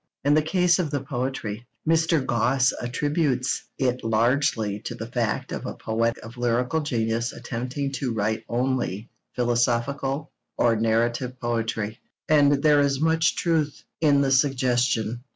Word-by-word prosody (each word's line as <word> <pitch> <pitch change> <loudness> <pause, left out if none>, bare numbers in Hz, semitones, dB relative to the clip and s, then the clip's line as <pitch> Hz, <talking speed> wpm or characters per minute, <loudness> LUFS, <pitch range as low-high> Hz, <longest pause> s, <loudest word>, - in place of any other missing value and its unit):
In 145 +1 +3
the 155 - +5
case 180 +3 +2
of 170 -4 0
the 145 -2 -2
poetry, 120 -4 -4 0.2
Mr. 160 -3 +2
Gosse 125 +2 +2
attributes 135 +1 0
it 125 -1 0
largely 115 -2 +1
to 120 - -6
the 115 - -6
fact 115 -2 -2
of - - -4
a - - -5
poet 115 +1 -1
of 115 +3 -11
lyrical 120 +5 +1
genius 115 -5 -1
attempting 130 +4 -4
to 135 -2 -2
write 110 0 -1
only 120 -3 -1 0.2
philosophical 125 +4 0 0.3
or 115 -1 +3
narrative 120 +3 0
poetry; 115 -2 -2 0.3
and 145 -2 +4
there 150 -2 +5
is 140 -1 +1
much 160 +1 +2
truth 160 -4 0 0.2
in 145 -3 +4
the 135 -1 +1
suggestion. 125 -4 +1
125 Hz, 140 wpm, -25 LUFS, 115-145 Hz, 0.3 s, the